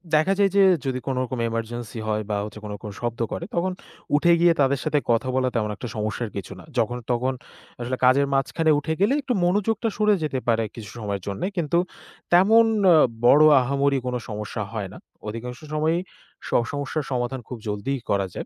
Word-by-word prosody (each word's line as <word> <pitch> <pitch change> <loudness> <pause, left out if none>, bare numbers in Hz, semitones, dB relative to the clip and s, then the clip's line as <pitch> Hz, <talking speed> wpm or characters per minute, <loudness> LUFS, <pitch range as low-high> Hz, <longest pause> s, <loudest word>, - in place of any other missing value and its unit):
দেখা 155 +6 +3
যায় 200 -1 +5
যে 200 - +6 0.2
যদি 130 -1 -1
কোনরকম 130 -1 -2
emergency 115 0 -5
হয় 110 0 0
বা 105 - 0
হচ্ছে 105 0 -9
কোনো 105 -1 -5
রকম 105 +1 -8
শব্দ 120 -1 -3
করে, - - -4
তখন 185 +2 +1 0.4
উঠে 170 +3 +4
গিয়ে 170 0 +5
তাদের 135 0 +2
সাথে 150 -2 +1
কথা 115 +2 +1
বলা 130 -1 +2
তেমন 105 -2 0
একটা 120 - -7
সমস্যার 110 +2 -2
কিছু 100 0 -6
না। - - -12
যখন 120 +1 +1
তখন 125 +2 +1 0.5
আসলে 125 +2 -2
কাজের 140 +2 +4
মাঝখানে 155 +4 +1
উঠে 160 +2 -2
গেলে 210 +7 +4
একটু 255 -2 -1
মনোযোগটা 210 +5 +1
সরে 210 -1 +4
যেতে 135 -4 -1
পারে 115 -1 +2
কিছু 110 -4 -8
সময়ের 100 -3 -3
জন্যে। 100 - -3
কিন্তু 170 0 +1 0.6
তেমন 220 +6 +6 0.3
আ - - +7 0.3
বড় 145 +5 +7 0.2
আহামরি 140 +2 +1
কোনো 125 - -1
সমস্যা 105 +1 -4
হয় 105 -4 -4
না। - - -10 0.3
অধিকাংশ 120 +3 -6
সময়ই 160 +3 +1 0.5
স - - -7 0.2
সমস্যার 145 +2 -2
সমাধান 125 +1 -1
খুব 125 - -6
জলদিই 105 +6 -2
করা 100 -1 +2
যায়। - - -5
130 Hz, 190 wpm, -24 LUFS, 115-155 Hz, 0.6 s, আ